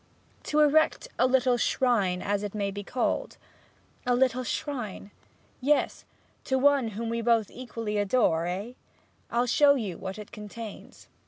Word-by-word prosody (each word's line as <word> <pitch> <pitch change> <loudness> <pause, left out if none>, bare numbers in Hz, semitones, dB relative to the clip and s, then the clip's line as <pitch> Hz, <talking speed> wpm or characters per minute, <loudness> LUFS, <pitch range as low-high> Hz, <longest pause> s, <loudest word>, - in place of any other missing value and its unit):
'To 305 0 +1
erect 315 +10 +3
a 255 - +5
little 255 -1 +3
shrine, 210 -8 +1
as 200 0 0
it 205 0 -5
may 200 -1 -1
be 205 +1 -6
called.' 250 +5 -2 0.7
'A 245 - +3
little 255 0 +2
shrine?' 245 -8 -4 0.5
'Yes; 290 +3 +1 0.4
to 265 - 0
one 275 -2 +4
whom 230 +1 -3
we 230 +1 -1
both 230 -2 +2
equally 230 -4 -4
adore 195 -6 +2
eh? 195 +7 -4 0.6
I'll 240 +1 +1
show 280 +3 +5
you 205 -10 -4
what 190 +1 -6
it 210 -1 -9
contains.' 215 0 -9
235 Hz, 150 wpm, -28 LUFS, 205-255 Hz, 0.7 s, a